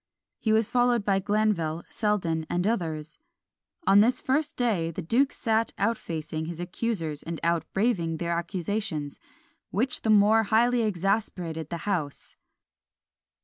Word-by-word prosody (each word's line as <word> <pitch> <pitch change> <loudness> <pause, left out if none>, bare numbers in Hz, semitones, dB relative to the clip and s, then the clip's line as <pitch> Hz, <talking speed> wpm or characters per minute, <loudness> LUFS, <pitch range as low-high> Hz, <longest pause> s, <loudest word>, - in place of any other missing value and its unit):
He 220 - 0
was 220 0 +3
followed 245 -3 +2
by 195 -1 +2
Glanville, 195 -6 0
Selden, 175 -7 0
and 175 +1 0
others. 165 - -2 0.7
On 200 - +6
this 235 +4 +4
first 300 +4 0
day 210 -10 +1
the 170 +2 -5
duke 255 - +2
sat 225 -1 0
out 225 +3 +1
facing 160 -4 -5
his 170 0 -6
accusers 175 -4 -3
and 165 -1 -5
out 170 0 0
braving 190 -7 0
their 170 +1 -2
accusations, 170 -3 -3 0.5
which 245 +7 0
the 220 - -1
more 215 +1 +6
highly 235 +3 +3
exasperated 180 -5 -1
the 170 - -5
house. 170 -9 -3
195 Hz, 140 wpm, -27 LUFS, 165-225 Hz, 0.7 s, On